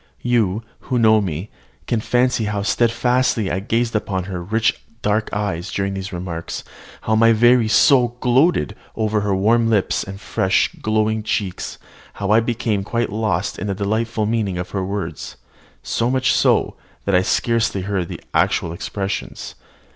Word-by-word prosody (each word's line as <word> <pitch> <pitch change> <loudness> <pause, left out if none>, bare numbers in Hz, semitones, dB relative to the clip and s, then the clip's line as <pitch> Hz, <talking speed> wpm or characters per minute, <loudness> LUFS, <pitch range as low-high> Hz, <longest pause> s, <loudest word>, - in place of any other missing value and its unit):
You, 115 -4 +1 0.3
who 125 - +1
know 110 -2 +5
me, 90 +1 -4 0.3
can 120 - 0
fancy 125 -1 +1
how 105 -1 -2
steadfastly 120 -1 +1
I 95 - 0
gazed 115 +3 -1
upon 95 -3 -1
her 90 -1 -5
rich 110 +5 0 0.2
dark 105 +1 +1
eyes 100 -3 -2
during 100 0 -1
these 95 0 -5
remarks, 85 -2 -5 0.4
how 110 - -1
my 115 +1 +5
very 120 +1 +4
soul 120 +1 +4
gloated 130 - +2 0.2
over 110 -1 0
her 100 -1 0
warm 115 +4 +3
lips 105 -4 +1
and 95 0 -8
fresh, 95 -2 +1
glowing 110 0 +1
cheeks, 100 -3 -3 0.4
how 100 0 -2
I 110 - +6
became 115 -3 -1
quite 115 +2 -1
lost 105 -3 -1
in 105 - -3
the 100 - -1
delightful 110 +2 -1
meaning 105 -4 -1
of 90 0 -5
her 95 -2 -2
words, 100 +1 -5 0.5
so 115 +1 0
much 130 0 +2
so, - - +2 0.3
that 100 - 0
I 90 - +5
scarcely 115 0 +1
heard 95 -2 -2
the - - -8
actual 85 - +1
expressions. 95 +3 -4
105 Hz, 160 wpm, -20 LUFS, 95-115 Hz, 0.5 s, I